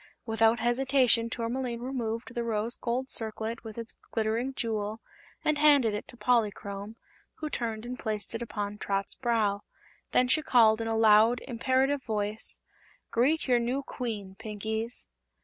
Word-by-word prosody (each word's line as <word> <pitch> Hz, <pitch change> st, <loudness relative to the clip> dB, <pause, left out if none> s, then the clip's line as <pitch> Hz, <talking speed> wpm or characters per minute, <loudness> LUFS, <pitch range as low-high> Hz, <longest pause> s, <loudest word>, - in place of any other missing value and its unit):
Without 225 Hz, 0 st, +3 dB
hesitation 245 Hz, -1 st, +3 dB
Tourmaline 235 Hz, 0 st, -3 dB
removed 240 Hz, -2 st, -3 dB
the 240 Hz, -1 st, -2 dB
rose 225 Hz, 0 st, 0 dB
gold 250 Hz, +2 st, -2 dB
circlet 225 Hz, +1 st, -2 dB
with 220 Hz, -1 st, -9 dB
its 230 Hz, -1 st, -4 dB
glittering 225 Hz, +3 st, 0 dB
jewel 215 Hz, -2 st, -2 dB, 0.5 s
and 305 Hz, -1 st, +2 dB
handed 285 Hz, -7 st, +5 dB
it 210 Hz, -, -4 dB
to 245 Hz, -, -13 dB
Polychrome, 210 Hz, -3 st, 0 dB, 0.4 s
who 305 Hz, -1 st, -5 dB
turned 225 Hz, -2 st, -3 dB
and 250 Hz, +1 st, -6 dB
placed 215 Hz, -1 st, -3 dB
it 230 Hz, -, -4 dB
upon 210 Hz, -3 st, -4 dB
Trot's 195 Hz, 0 st, -1 dB
brow. 220 Hz, -5 st, 0 dB, 0.5 s
Then 250 Hz, -, +4 dB
she 310 Hz, +5 st, +3 dB
called 230 Hz, -6 st, +5 dB
in 225 Hz, -, -2 dB
a 225 Hz, 0 st, 0 dB
loud, 220 Hz, +2 st, +6 dB
imperative 260 Hz, +3 st, +1 dB
voice: 215 Hz, -2 st, -1 dB, 0.5 s
"Greet 280 Hz, +8 st, +2 dB
your 245 Hz, -2 st, +4 dB
new 250 Hz, +4 st, -1 dB
Queen, 210 Hz, -8 st, -5 dB
Pinkies!" 220 Hz, +1 st, -4 dB
230 Hz, 150 wpm, -29 LUFS, 220-250 Hz, 0.5 s, loud